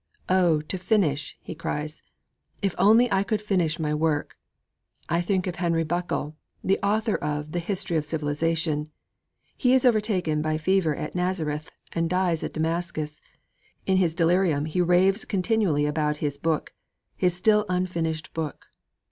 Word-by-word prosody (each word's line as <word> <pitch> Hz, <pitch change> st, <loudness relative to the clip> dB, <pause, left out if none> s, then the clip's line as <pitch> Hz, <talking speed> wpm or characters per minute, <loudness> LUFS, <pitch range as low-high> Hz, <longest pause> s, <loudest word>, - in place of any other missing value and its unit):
'Oh, 175 Hz, -4 st, +4 dB
to 180 Hz, +5 st, -5 dB
finish!' 170 Hz, -8 st, 0 dB
he -, -, -6 dB
cries; 150 Hz, -1 st, -4 dB, 0.6 s
'if 195 Hz, -3 st, +1 dB
only 220 Hz, +6 st, +6 dB
I 195 Hz, -1 st, +3 dB
could 210 Hz, +1 st, 0 dB
finish 180 Hz, -6 st, 0 dB
my 150 Hz, -2 st, -1 dB
work!' 150 Hz, -1 st, 0 dB, 0.7 s
I 170 Hz, +1 st, +1 dB
think 185 Hz, +1 st, 0 dB
of 180 Hz, -2 st, -4 dB
Henry 170 Hz, -2 st, +1 dB
Buckle, 165 Hz, -2 st, -2 dB, 0.3 s
the 195 Hz, -, +2 dB
author 215 Hz, +2 st, +1 dB
of 150 Hz, 0 st, -3 dB
the 175 Hz, -, -1 dB
History 175 Hz, -1 st, -1 dB
of 155 Hz, -, 0 dB
Civilization. 155 Hz, 0 st, -1 dB, 0.7 s
He 255 Hz, -1 st, +3 dB
is 260 Hz, -, +3 dB
overtaken 205 Hz, -10 st, +2 dB
by 155 Hz, 0 st, 0 dB
fever 165 Hz, -1 st, +2 dB
at -, -, -5 dB
Nazareth 165 Hz, -5 st, -2 dB, 0.2 s
and 165 Hz, -1 st, 0 dB
dies 180 Hz, -2 st, +1 dB
at -, -, -4 dB
Damascus. 160 Hz, -1 st, -2 dB, 0.6 s
In 190 Hz, -1 st, +3 dB
his 170 Hz, -4 st, +2 dB
delirium 170 Hz, -3 st, +2 dB
he 160 Hz, +3 st, 0 dB
raves 185 Hz, +4 st, +3 dB
continually 190 Hz, -7 st, +1 dB
about 150 Hz, 0 st, 0 dB
his 145 Hz, -1 st, -3 dB
book, 160 Hz, 0 st, -1 dB, 0.4 s
his 180 Hz, -1 st, +1 dB
still 210 Hz, +3 st, +3 dB
unfinished 170 Hz, -4 st, -2 dB
book. 160 Hz, -3 st, -4 dB
170 Hz, 150 wpm, -26 LUFS, 155-190 Hz, 0.7 s, only